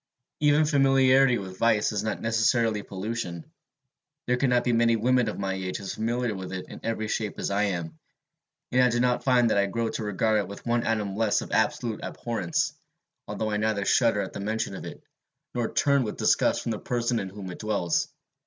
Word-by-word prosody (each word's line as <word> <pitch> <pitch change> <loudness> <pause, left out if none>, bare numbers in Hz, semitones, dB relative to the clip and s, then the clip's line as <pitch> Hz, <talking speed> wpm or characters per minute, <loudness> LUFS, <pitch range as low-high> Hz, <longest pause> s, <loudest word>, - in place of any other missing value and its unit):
Even 150 +1 +4
familiarity 135 -3 +4
with 95 -2 -8
vice 110 -3 +3
is 105 - -2
not 110 - -2
necessarily 115 -1 +2
pollution. 95 -4 -5 0.8
There 125 - +2
cannot 125 -1 +2
be 120 - +1
many 115 0 +3
women 125 +1 +2
of - - -5
my 95 -1 -2
age 95 -1 -4
as 100 -2 -5
familiar 120 +1 -1
with 95 -2 -6
it 95 - -6
in - - -9
every 110 -1 -2
shape 105 -1 -2
as - - -2
I 100 +1 +2
am; 85 -5 -4 0.7
and 130 - +4
I 125 - +5
do 120 0 0
not 125 0 +1
find 125 -3 +3
that - - +3
I 100 - +2
grow 115 +3 -1
to 110 - -4
regard 105 +1 +1
it 100 - -2
with 100 - -10
one 120 0 +1
atom 105 -3 -1
less 110 -1 +1
of - - -8
absolute 120 -2 0
abhorrence, 115 -8 -2 0.5
although 110 -1 -3
I 105 - 0
neither 105 -2 0
shudder 115 -3 +3
at 95 - -5
the - - -6
mention 110 +1 -2
of - - -7
it, - - -9 0.5
nor 120 -2 -1
turn 140 -1 +3
with 110 -4 -4
disgust - - +2
from - - -2
the 110 - -3
person 120 -1 -1
in 95 - -4
whom 95 -1 -8
it - - -9
dwells. 100 -6 0
110 Hz, 210 wpm, -26 LUFS, 100-120 Hz, 0.8 s, I